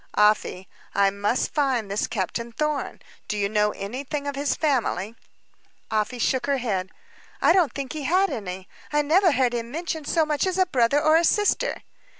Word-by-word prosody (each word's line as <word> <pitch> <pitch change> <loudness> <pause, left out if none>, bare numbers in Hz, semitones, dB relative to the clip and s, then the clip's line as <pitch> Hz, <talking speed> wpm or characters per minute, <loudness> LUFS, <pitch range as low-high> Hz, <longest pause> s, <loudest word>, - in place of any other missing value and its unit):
"Afy, 210 -3 +2 0.3
I 200 -1 +4
must 205 +5 -1
find 260 -8 0
this 200 - 0
Captain 230 +3 -3
Thorn. 300 +3 -3 0.2
Do 210 - -2
you 200 -1 +1
know 210 0 +2
anything 265 +9 -5
of 285 -1 -3
his 280 +1 0
family?" 235 - 0 0.8
Afy 215 +3 0
shook 260 +3 0
her 280 -1 +2
head. 195 -7 -2 0.5
"I - - +5
don't 360 -6 +3
think 275 0 -5
he 310 - -5
had 375 +6 +2
any. 190 -3 -5 0.2
I 295 0 +2
never 350 +5 +4
heard 250 -2 +2
him 235 -1 -3
mention 320 +2 -4
as - - -2
much 300 +4 0
as 370 0 -1
a 375 - +4
brother 265 -4 +2
or 310 +1 +4
a 335 - +2
sister." 415 +7 +1
260 Hz, 180 wpm, -24 LUFS, 210-305 Hz, 0.8 s, I